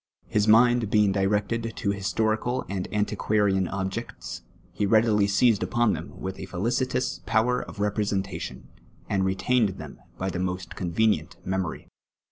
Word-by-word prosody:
His 105 0 +1
mind 120 0 +5
bein«^ 105 -2 +3
directed 105 +4 0
to 100 - -1
historical 110 +5 -1
and 95 -2 -4
anticpiarian 105 -2 +1
objects, 95 -1 -4 0.3
he 105 - 0
readily 110 -1 +4
seized 100 +2 +3
upon 120 -3 +2
them - - -7
with 95 0 -5
a 95 - -6
felicitous 120 -1 -1
power 120 +2 +2
of - - -10
representation, 100 -2 -2 0.4
and 95 -1 +1
retained 95 +2 +1
them 75 -2 -9 0.2
bv 95 +1 -1
the 90 - -4
most 90 0 -3
convenient 90 -2 0
memory 95 -3 -3
105 Hz, 135 wpm, -26 LUFS, 95-110 Hz, 0.4 s, mind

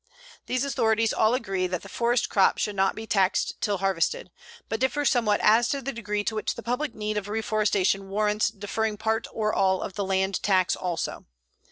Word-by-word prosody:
These 255 +2 0
authorities 225 -5 +1
all 220 +2 +3
agree 195 -7 -1
that 180 -1 -4
the - - -9
forest 235 +4 0
crop 195 -2 +3
should 210 - -2
not 195 0 +2
be 220 - -6
taxed 195 -3 +1
till 205 -1 0
harvested, 195 - -1 0.4
but 225 - -3
differ 265 +3 0
somewhat 230 -6 +2
as 225 +2 +5
to 280 - -1
the 275 +1 -4
degree 210 -2 -3
to 220 - -2
which 215 - -2
the 235 - -8
public 250 +5 -2
need 210 0 -3
of 205 -1 -3
reforestation 205 -3 0
warrants 210 +1 +1
deferring 210 +1 -3
part 220 +1 -1
or 215 -1 -1
all 190 -1 +2
of - - -6
the 200 - -2
land 190 0 0
tax 185 -4 +2
also. 175 -3 -4
210 Hz, 195 wpm, -26 LUFS, 195-230 Hz, 0.4 s, as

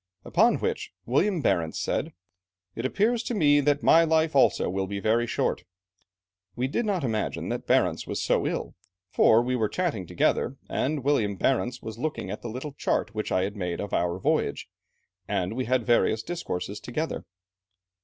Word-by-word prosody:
Upon - - +4
which, - - -3
William 165 - +1
Barentz 80 -2 +1
said, - - -2 0.6
'It 115 +3 -1
appears 225 - +1
to 240 -1 -3
me 145 -6 +4
that 145 0 +1
my 165 - +6
life 160 -1 +2
also 135 - +4
will 95 +1 -2
be 100 +1 -4
very 115 +3 +1
short.' - - -1 0.9
We 125 +2 0
did 220 - -1
not 190 -6 0
imagine 110 -4 -2
that - - -4
Barentz - - +2
was - - -3
so - - +1
ill, - - -3 0.4
for 115 +2 +5
we 125 +1 -1
were 110 -4 0
chatting 155 - -2
together, - - 0
and 145 -1 -1
William 115 -8 +1
Barentz 125 +2 0
was 110 0 -7
looking 150 -9 -3
at 105 - -6
the 120 - -5
little 130 +5 -6
chart 135 - -1
which 110 -1 -3
I 95 - +2
had 100 +2 -3
made 90 -4 -3
of 100 - -5
our 85 0 0
voyage, 95 - 0 0.6
and 90 +3 -1
we 130 0 -1
had 125 -1 +1
various 115 -2 +2
discourses 100 - -4
together. 155 +9 -4
125 Hz, 175 wpm, -26 LUFS, 105-150 Hz, 0.9 s, my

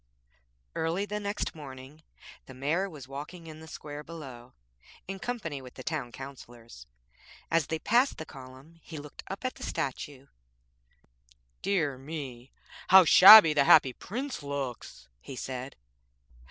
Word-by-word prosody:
Early 165 +5 -1
the 210 0 -4
next 205 0 -3
morning 140 0 -11 0.5
the 130 - -11
Mayor 160 +9 -1
was 145 -6 -11
walking 150 +5 -9
in 155 -1 -10
the 160 - -12
square 150 -1 -8
below 135 -7 -11 0.5
in 195 +1 -6
company 190 - -5
with 125 -1 -13
the 130 - -9
Town 150 -6 -4
Councillors. 120 - -12 0.6
As 165 -3 +2
they 160 - -2
passed 245 - +2
the 160 - -7
column 135 +4 -14
he 160 - -10
looked 145 0 -10
up 195 +5 -7
at 255 - -1
the - - -11
statue: 135 0 -5 1.4
'Dear 150 -10 -1
me! 135 -4 -8 0.4
how 190 -1 +8
shabby 190 -2 +10
the 140 -2 +3
Happy 130 -1 +6
Prince 255 - -6
looks!' 140 - -6
he 130 - -10
said. 130 +1 -6
150 Hz, 140 wpm, -29 LUFS, 130-170 Hz, 1.4 s, shabby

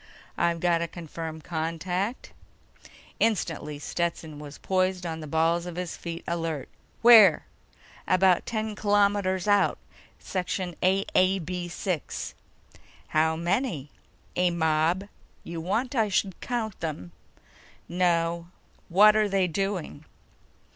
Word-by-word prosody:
"I've 170 -1 +1
got 170 -1 +2
a 170 - -1
confirmed 160 -1 -7
contact." 180 +6 -3 0.9
Instantly, 165 -9 0
Stetson 160 -1 -3
was 145 -1 -9
poised 185 -1 0
on 160 -1 -4
the 155 - -7
balls 165 +3 +1
of 175 - -6
his 180 -1 -4
feet, 170 -1 -6
alert. 165 -4 -3 0.3
"Where?" 220 -9 +8 0.6
"About 185 -1 +3
ten 220 -1 -2
kilometers 205 -2 +1
out. 205 -1 +3 0.4
Section 180 -1 -3
AAB 185 -2 +1
6." 180 -2 -3 0.8
"How 160 +1 +2
many?" 170 - -1 0.4
"A 180 0 +3
mob. 160 +2 +1 0.4
You 170 -1 -6
want 225 - -1
I 225 -5 +2
should 190 -1 0
count 225 -5 -3
them?" 145 - -5 0.8
"No. 170 -1 +1 0.4
What're 210 +3 +6
they 195 -1 +2
doing?" 180 -4 -3
175 Hz, 110 wpm, -27 LUFS, 165-195 Hz, 0.9 s, Where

